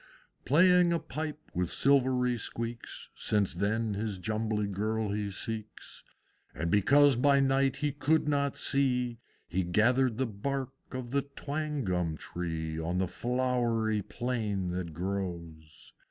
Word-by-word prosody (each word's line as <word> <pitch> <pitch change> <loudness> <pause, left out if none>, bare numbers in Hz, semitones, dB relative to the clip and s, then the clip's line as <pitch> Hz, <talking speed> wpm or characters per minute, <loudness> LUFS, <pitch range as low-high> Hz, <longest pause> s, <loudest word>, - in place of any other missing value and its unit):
Playing 180 +2 +5
a 170 - +3
pipe 155 -1 -6
with 90 -1 -1
silvery 130 -2 +3
squeaks, 115 +1 -5
Since 105 -3 0
then 105 +4 0
his 105 -1 -3
Jumbly 110 +2 -1
Girl 105 +2 -1
he 105 0 -2
seeks; 110 +2 -5 0.5
And 85 - -2
because 140 +7 +5
by 140 +3 +4
night 135 0 +2
he 150 -1 0
could 150 +2 +1
not 140 -1 +1
see, 125 -4 +1 0.3
He 95 +3 0
gathered 115 +7 +2
the 130 - +1
bark 130 +5 -3 0.2
of 130 -2 -5
the 140 +1 +2
Twangum 140 - -2
Tree 80 -2 -4
On 85 +3 -2
the 95 0 +1
flowery 120 -1 0
plain 105 -5 -2
that 90 -2 -3
grows. 85 -4 -5
115 Hz, 130 wpm, -30 LUFS, 100-135 Hz, 0.5 s, Playing